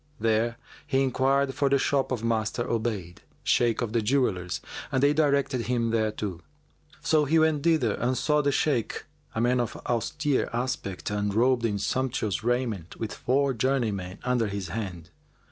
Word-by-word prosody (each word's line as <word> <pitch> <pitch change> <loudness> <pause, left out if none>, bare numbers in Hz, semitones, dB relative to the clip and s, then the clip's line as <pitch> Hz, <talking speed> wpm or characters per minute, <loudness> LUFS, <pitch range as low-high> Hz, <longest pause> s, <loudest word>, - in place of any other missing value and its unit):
There 115 +1 +1 0.3
he 135 +1 +2
enquired 135 +1 +2
for 140 +1 +1
the 140 - +4
shop 135 -1 +1
of 120 -3 -2
Master 115 0 0
Obayd, 110 -8 -3 0.2
Shaykh 120 0 +2
of 115 -2 -4
the 115 - +2
Jewellers, 105 -7 0 0.3
and 130 - +1
they 145 +1 +5
directed 140 -6 +1
him 120 -2 +1
thereto. 105 -5 -1 0.6
So 155 -1 +3
he 160 +4 +3
went 160 -2 +3
thither 155 -9 +2
and 125 +2 +1
saw 150 +3 +2
the 140 0 +1
Shaykh, 135 -5 0 0.3
a - - 0
man 125 +1 +3
of 120 -2 -2
austere 145 +4 0
aspect 120 -7 -3
and 105 0 0
robed 120 +3 +3
in 105 -3 0
sumptuous 115 -2 -1
raiment 120 -8 -1
with 110 -1 -3
four 135 +2 +1
journeymen 110 -7 -1
under 125 -3 +1
his 100 -3 -4
hand. 90 -5 -5
120 Hz, 160 wpm, -27 LUFS, 110-135 Hz, 0.6 s, they